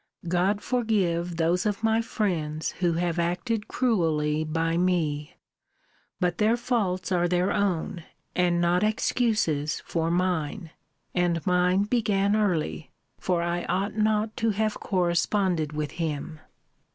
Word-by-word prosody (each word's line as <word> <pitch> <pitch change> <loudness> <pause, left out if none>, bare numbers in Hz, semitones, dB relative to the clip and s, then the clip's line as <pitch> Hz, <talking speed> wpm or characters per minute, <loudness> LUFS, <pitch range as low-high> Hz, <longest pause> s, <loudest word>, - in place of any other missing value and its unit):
God 185 +4 +1
forgive 185 -9 0
those 170 +3 +2
of 210 +1 -2
my 225 0 +3
friends 160 -9 -2
who 175 -2 +2
have 170 0 -1
acted 185 +6 -1
cruelly 160 -10 +1
by 165 +1 -1
me! 170 -3 0 0.8
But 175 -2 0
their 220 +2 +3
faults 205 -7 -1
are 175 -1 +2
their 180 +2 +1
own, 175 -4 -1 0.3
and 175 -1 +2
not 175 +1 +2
excuses 215 - +1
for 165 -1 -1
mine. 175 -1 -1 0.4
And 175 -2 0
mine 180 +1 +3
began 205 -3 +1
early: 170 -8 0 0.3
for 175 -2 0
I 170 0 -1
ought 195 +4 -1
not 215 0 +1
to 225 - +1
have 215 0 -1
corresponded 175 -2 +1
with 150 -1 -3
him. 155 -1 -4
180 Hz, 125 wpm, -26 LUFS, 165-210 Hz, 0.8 s, my